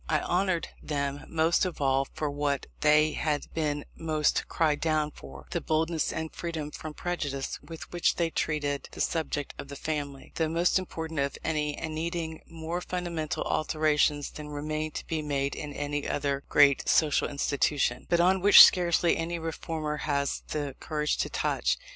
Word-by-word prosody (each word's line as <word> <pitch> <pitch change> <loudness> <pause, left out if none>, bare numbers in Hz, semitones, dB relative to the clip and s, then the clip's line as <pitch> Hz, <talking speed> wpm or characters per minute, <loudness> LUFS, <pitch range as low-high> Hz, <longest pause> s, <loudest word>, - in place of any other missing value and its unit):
I 155 - +3
honoured 180 -2 0
them 140 -1 -3
most 165 +1 +2
of 185 -3 -2
all 135 -1 +2
for 155 - -1
what 145 -1 -1
they 155 +1 +5
have 150 -2 -2
been 145 -2 -1
most 155 -2 0
cried 155 -3 +1
down 155 -2 +1
for 70 - -12
the - - -1
boldness 160 0 0
and 160 0 -4
freedom 160 -3 -4
from 155 0 -7
prejudice 145 -6 -3
with 165 -1 -10
which 175 -1 +2
they 170 -1 0
treated 145 -3 -1
the - - -10
subject 150 -3 -1
of - - -6
the 140 - -8
family, 145 -2 -4
the 160 -1 +1
most 170 +3 +2
important 160 -4 -5
of 140 0 -1
any, 150 -2 -1
and 160 -1 -4
needing 160 0 -3
more 165 +1 -4
fundamental 175 -4 -3
alterations 150 -2 +1
than 150 -1 -8
remain 155 +1 -3
to - - -6
be 160 -1 -2
made 140 -2 -1
in 150 -1 -6
any 145 0 -3
other 140 -1 -1
great 140 -2 +5
social 150 -3 +3
institution, 140 -2 0
but 170 - +3
on 185 +2 +4
which 205 +2 +11
scarcely 175 -1 +4
any 170 +1 -2
reformer 160 -2 -3
has 140 -2 -1
the 145 -3 -3
courage 150 -1 -1
to - - -1
touch. - - 0
155 Hz, 170 wpm, -28 LUFS, 145-165 Hz, -, which